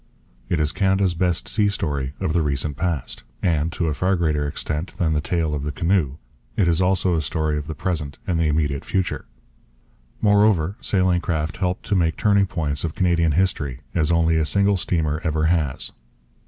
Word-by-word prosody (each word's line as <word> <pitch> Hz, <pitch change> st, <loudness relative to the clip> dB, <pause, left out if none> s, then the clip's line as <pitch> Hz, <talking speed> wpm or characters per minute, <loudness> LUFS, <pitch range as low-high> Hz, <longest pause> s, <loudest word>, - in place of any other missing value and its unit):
It 85 Hz, -, +1 dB
is 75 Hz, -1 st, +1 dB
Canada's 95 Hz, -2 st, +2 dB
best 85 Hz, 0 st, 0 dB
sea 105 Hz, -1 st, +2 dB
story 70 Hz, -8 st, -2 dB
of 80 Hz, -, -1 dB
the 85 Hz, -, +2 dB
recent 70 Hz, 0 st, -1 dB
past. 80 Hz, -7 st, -2 dB, 0.2 s
And, 80 Hz, -2 st, +1 dB
to 85 Hz, -, -1 dB
a 80 Hz, -, 0 dB
far 95 Hz, +6 st, +1 dB
greater 75 Hz, -4 st, 0 dB
extent 75 Hz, +4 st, -3 dB
than 80 Hz, -3 st, +1 dB
the 75 Hz, -, +1 dB
tale 80 Hz, -2 st, -1 dB
of 75 Hz, -, -2 dB
the 75 Hz, +1 st, -3 dB
canoe, 85 Hz, -3 st, 0 dB, 0.4 s
it 95 Hz, -, +3 dB
is 85 Hz, +1 st, +2 dB
also 95 Hz, -1 st, +2 dB
a 80 Hz, -, +1 dB
story 80 Hz, 0 st, -1 dB
of 75 Hz, 0 st, -4 dB
the 80 Hz, -, -5 dB
present 75 Hz, -5 st, -3 dB
and 85 Hz, -3 st, 0 dB
the 80 Hz, -, +2 dB
immediate 75 Hz, -2 st, 0 dB
future. 95 Hz, -2 st, -2 dB, 0.9 s
Moreover, 105 Hz, -4 st, +3 dB
sailing 90 Hz, -3 st, +2 dB
craft 80 Hz, -2 st, -2 dB
helped 90 Hz, +1 st, -2 dB
to 105 Hz, -, 0 dB
make 85 Hz, -3 st, +1 dB
turning 100 Hz, -2 st, +3 dB
points 75 Hz, -5 st, -2 dB
of 80 Hz, -2 st, -3 dB
Canadian 85 Hz, -3 st, +2 dB
history 75 Hz, -7 st, 0 dB
as 80 Hz, -1 st, +1 dB
only 80 Hz, -1 st, +3 dB
a 80 Hz, -, +2 dB
single 100 Hz, +4 st, +2 dB
steamer 80 Hz, -4 st, 0 dB
ever 80 Hz, 0 st, 0 dB
has. 80 Hz, -5 st, +1 dB
80 Hz, 190 wpm, -22 LUFS, 75-90 Hz, 0.9 s, it